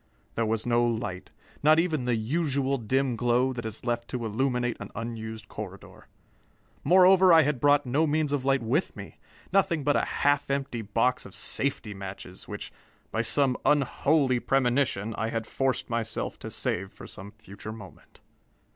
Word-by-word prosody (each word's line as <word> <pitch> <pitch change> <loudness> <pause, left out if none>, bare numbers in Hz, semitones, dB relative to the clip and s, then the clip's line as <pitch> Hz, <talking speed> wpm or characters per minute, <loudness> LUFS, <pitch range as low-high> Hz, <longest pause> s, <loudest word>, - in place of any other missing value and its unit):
There 115 -1 0
was 110 0 -1
no 120 0 +3
light, 110 -6 -2 0.3
not 155 +2 +5
even 160 -6 +1
the 125 -1 +1
usual 135 +2 0
dim 130 +3 0
glow 125 +2 +2
that 120 -2 -5
is 110 - -7
left 120 -1 -1
to 120 -2 -4
illuminate 125 +1 0
an - - -7
unused 110 -1 -6
corridor. 100 -3 -9 0.8
Moreover, 185 0 +6
I 165 -1 +8
had 145 -2 0
brought 145 +1 +4
no 145 +6 +1
means 150 -1 0
of 145 -3 0
light 135 -2 +2
with 135 +11 0
me - - -10 0.3
nothing 170 -6 +2
but 145 +1 +2
a - - +2 0.2
half 145 0 +2
empty 135 -4 -2
box 115 +4 0
of 100 - -12
safety 135 -6 -2
matches 95 -1 -9
which, - - -7 0.4
by - - 0
some 135 -3 +2
unholy 140 -1 +2
premonition, 120 -5 +1
I 110 0 -1
had 115 -1 -3
forced 130 +1 -1
myself 115 -1 -3
to - - -7
save 95 +2 -2
for - - -12
some 100 - -9
future 105 0 -10
moment. 105 -4 -13
125 Hz, 165 wpm, -27 LUFS, 110-140 Hz, 0.8 s, I